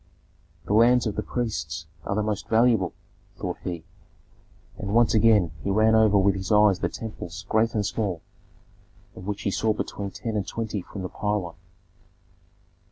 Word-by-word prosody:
"The -, -, -1 dB
lands 120 Hz, +3 st, +5 dB
of 110 Hz, -, -2 dB
the 105 Hz, -, -1 dB
priests 80 Hz, -, -3 dB, 0.2 s
are 100 Hz, -, -1 dB
the 105 Hz, -, +1 dB
most 105 Hz, -2 st, -3 dB
valuable," 110 Hz, -5 st, +3 dB, 0.4 s
thought -, -, -4 dB
he; 85 Hz, -3 st, -4 dB, 1.0 s
and 100 Hz, +1 st, -3 dB
once 120 Hz, -1 st, +4 dB
again 105 Hz, -6 st, +4 dB
he -, -, -2 dB
ran 110 Hz, +3 st, +4 dB
over 110 Hz, -2 st, +5 dB
with 100 Hz, 0 st, +4 dB
his 95 Hz, +2 st, -4 dB
eyes 105 Hz, -3 st, +5 dB
the -, -, 0 dB
temples 100 Hz, -4 st, -7 dB
great 115 Hz, +1 st, +2 dB
and 105 Hz, -1 st, +1 dB
small, 100 Hz, -5 st, -2 dB, 0.9 s
of 95 Hz, -, -9 dB
which 105 Hz, +1 st, -3 dB
he 100 Hz, -, 0 dB
saw 110 Hz, +2 st, +1 dB
between 100 Hz, -1 st, -4 dB
ten 110 Hz, +3 st, -5 dB
and 100 Hz, -2 st, -1 dB
twenty 110 Hz, -3 st, -3 dB
from 95 Hz, +2 st, -8 dB
the 90 Hz, -, -4 dB
pylon. 105 Hz, -5 st, -2 dB
105 Hz, 165 wpm, -25 LUFS, 95-110 Hz, 1.0 s, lands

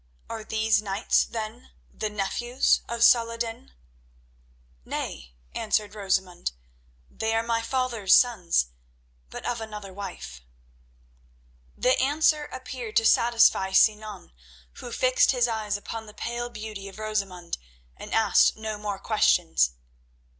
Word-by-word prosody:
Are 225 Hz, -1 st, -5 dB
these 220 Hz, -1 st, +1 dB
knights, 200 Hz, 0 st, +1 dB
then, 225 Hz, +2 st, -7 dB, 0.2 s
the 215 Hz, -, -3 dB
nephews 240 Hz, +5 st, +1 dB
of 235 Hz, 0 st, 0 dB
Salah 230 Hz, -1 st, +5 dB
ed 230 Hz, -, -5 dB
din?" 225 Hz, -, -5 dB, 1.1 s
"Nay," -, -, -6 dB, 0.2 s
answered 210 Hz, -2 st, -1 dB
Rosamund, 190 Hz, -, -1 dB, 0.5 s
"they 225 Hz, -, -2 dB
are 225 Hz, -, +1 dB
my 230 Hz, 0 st, 0 dB
father's 235 Hz, -5 st, +2 dB
sons, 180 Hz, -, +2 dB, 0.6 s
but -, -, -8 dB
of 240 Hz, -1 st, -2 dB
another 210 Hz, -3 st, -8 dB
wife." 180 Hz, -, -8 dB, 1.4 s
The 255 Hz, 0 st, +2 dB
answer 300 Hz, +2 st, +2 dB
appeared 255 Hz, -5 st, -7 dB
to 225 Hz, -, +4 dB
satisfy 230 Hz, -5 st, +4 dB
Sinan, 210 Hz, -1 st, +2 dB, 0.5 s
who 240 Hz, -, -8 dB
fixed 255 Hz, +2 st, +3 dB
his 245 Hz, -1 st, +2 dB
eyes 215 Hz, -3 st, -2 dB
upon 220 Hz, +2 st, -7 dB
the 210 Hz, -, -13 dB
pale 240 Hz, +1 st, -4 dB
beauty 215 Hz, -3 st, -7 dB
of 195 Hz, -, -11 dB
Rosamund 195 Hz, -, -3 dB, 0.4 s
and -, -, -10 dB
asked 220 Hz, -3 st, +4 dB
no 220 Hz, -1 st, -5 dB
more 205 Hz, -1 st, -3 dB
questions. 170 Hz, -, +2 dB
215 Hz, 125 wpm, -26 LUFS, 195-235 Hz, 1.4 s, Salah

